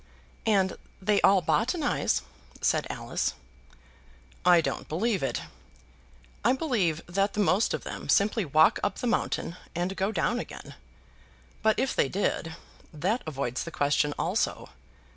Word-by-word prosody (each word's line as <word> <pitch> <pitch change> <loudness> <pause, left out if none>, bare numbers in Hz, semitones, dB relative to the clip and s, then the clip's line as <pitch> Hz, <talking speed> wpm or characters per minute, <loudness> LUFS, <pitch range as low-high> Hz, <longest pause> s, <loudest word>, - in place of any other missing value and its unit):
"And 195 -3 +2 0.2
they 200 +1 +2
all 195 -2 +5
botanize," 270 - +1 0.4
said - - +1
Alice. - - -2 1.1
"I 175 -1 +7
don't 165 - -3
believe 200 +5 0
it. 135 - -2 1.0
I 240 +4 +4
believe 215 - 0
that 195 +3 0
the - - -3
most 205 +1 +3
of - - -7
them - - -7
simply 210 +2 +3
walk 155 0 +4
up 205 - 0
the - - -4
mountain 230 -7 -1 0.2
and 180 +3 -1
down 195 -2 0
again. - - -8 0.9
But 220 0 +3
if 265 - 0
they 135 - +2
did, 165 -3 -1 0.4
that 185 - -1
avoids 135 -4 -2
the - - -6
question 145 -1 +1
also. 185 +7 -1
190 Hz, 135 wpm, -28 LUFS, 165-215 Hz, 1.1 s, I